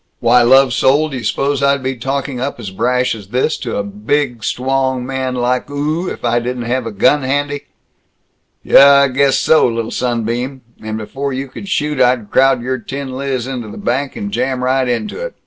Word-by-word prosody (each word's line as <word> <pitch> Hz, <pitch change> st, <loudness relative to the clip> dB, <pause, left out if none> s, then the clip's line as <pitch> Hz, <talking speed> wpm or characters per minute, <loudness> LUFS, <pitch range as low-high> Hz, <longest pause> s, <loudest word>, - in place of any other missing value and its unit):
"Why, 120 Hz, +1 st, +4 dB
lovesoul, 135 Hz, +4 st, +4 dB
d' -, -, -10 dB
you 125 Hz, -, -6 dB
suppose 140 Hz, +5 st, 0 dB
I'd 140 Hz, -1 st, +2 dB
be 130 Hz, 0 st, -2 dB
talking 135 Hz, +1 st, -3 dB
up 135 Hz, -1 st, -3 dB
as 105 Hz, -5 st, -6 dB
brash 125 Hz, +5 st, 0 dB
as 105 Hz, -3 st, -9 dB
this 125 Hz, +8 st, 0 dB
to 120 Hz, -4 st, -5 dB
a 100 Hz, -, -1 dB
bid, 115 Hz, +4 st, -2 dB
stwong 130 Hz, 0 st, -1 dB
man 130 Hz, -1 st, -3 dB
like 125 Hz, +2 st, -1 dB
oo 150 Hz, +5 st, -2 dB
if -, -, -5 dB
I 120 Hz, 0 st, +2 dB
didn't 125 Hz, 0 st, -4 dB
have 125 Hz, 0 st, -1 dB
a -, -, -4 dB
gun 125 Hz, +8 st, +3 dB
handy?" 145 Hz, +2 st, -2 dB, 1.0 s
"Yuh, -, -, +6 dB
I 140 Hz, 0 st, +7 dB
guess 135 Hz, +1 st, +2 dB
so, 160 Hz, -, +4 dB
lil 115 Hz, -1 st, -3 dB
sunbeam. 120 Hz, +2 st, -2 dB, 0.2 s
And 110 Hz, 0 st, -4 dB
before 135 Hz, +6 st, -4 dB
you 135 Hz, +1 st, -4 dB
could 195 Hz, +9 st, -9 dB
shoot, 150 Hz, -6 st, 0 dB
I'd 125 Hz, -4 st, +2 dB
crowd 135 Hz, -2 st, +3 dB
your 130 Hz, +1 st, -2 dB
tin 135 Hz, +3 st, -6 dB
liz 130 Hz, -2 st, -2 dB
into 125 Hz, -4 st, -5 dB
the 105 Hz, -, -9 dB
bank, 130 Hz, +3 st, -2 dB
and 100 Hz, 0 st, -5 dB
jam 125 Hz, +3 st, -1 dB
right 130 Hz, 0 st, +1 dB
into 210 Hz, -, -3 dB
it! -, -, -6 dB
130 Hz, 200 wpm, -16 LUFS, 120-140 Hz, 1.0 s, I